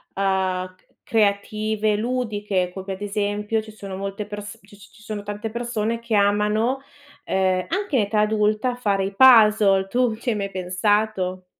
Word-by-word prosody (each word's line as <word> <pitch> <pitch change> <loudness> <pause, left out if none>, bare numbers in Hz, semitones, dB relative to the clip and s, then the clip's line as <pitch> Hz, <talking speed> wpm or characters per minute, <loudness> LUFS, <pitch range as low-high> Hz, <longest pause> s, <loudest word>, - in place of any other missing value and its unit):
c 185 -1 -1 0.2
creative, 215 0 0
ludiche, 210 -6 -1
come 190 +1 -5
ad 190 - -10
esempio 205 +1 -1
ci 215 0 -12
sono 200 -3 -8
molte 195 +2 -4
perso 205 +2 -8
c 200 - -23
ci 205 +2 -18
sono 215 -1 -5
tante 205 +2 -5
persone 230 -1 -2
che 235 -1 -2
amano, 210 +5 +2 0.5
uhm, 185 -1 +1
anche 390 -4 -2
in - - +4
età 210 +1 0
adulta 215 +3 +1
fare 200 -5 0
i 195 +1 -3
puzzle. 215 -5 +6
Tu 245 0 +1
ci 235 +3 -4
hai 225 - +1
mai 195 -1 -3
pensato? 185 0 -1
210 Hz, 155 wpm, -23 LUFS, 195-220 Hz, 0.5 s, puzzle